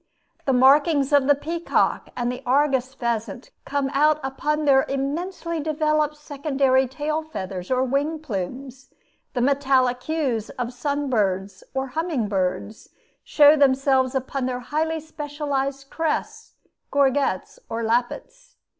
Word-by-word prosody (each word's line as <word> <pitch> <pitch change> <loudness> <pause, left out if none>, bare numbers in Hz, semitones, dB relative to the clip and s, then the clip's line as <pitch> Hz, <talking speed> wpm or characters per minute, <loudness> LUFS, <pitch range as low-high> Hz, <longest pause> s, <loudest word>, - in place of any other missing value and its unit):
The 270 - +2
markings 280 +2 +4
of 280 -2 +4
the 290 - +6
peacock 330 +4 -1
and 245 0 -1
the 250 - -6
argus 265 0 +1
pheasant 235 +2 -3
come 280 -1 -1
out 300 +2 +3
upon 300 +3 -1
their 270 -2 +5
immensely 335 +5 -3
developed 305 0 0
secondary 275 -3 +1
tail 305 +4 -2
feathers 190 - -6
or 255 0 +2
wing 280 +5 0
plumes; 260 - -6 0.5
the 245 - 0
metallic 260 -2 +2
hues 270 -9 -2
of 245 0 -3
sun 285 +3 -2
birds, 195 -3 -1
or 265 0 -2
humming 310 -5 -1
birds, 195 +2 -3 0.3
show 295 0 +6
themselves 270 -2 +3
upon 265 0 -2
their 250 -1 -3
highly 320 +5 -1
specialized 285 -3 -4
crests, 425 +7 -3 0.3
gorgets, 275 -8 +1
or 230 0 -3
lappets. 250 - -2
275 Hz, 130 wpm, -23 LUFS, 250-300 Hz, 0.5 s, the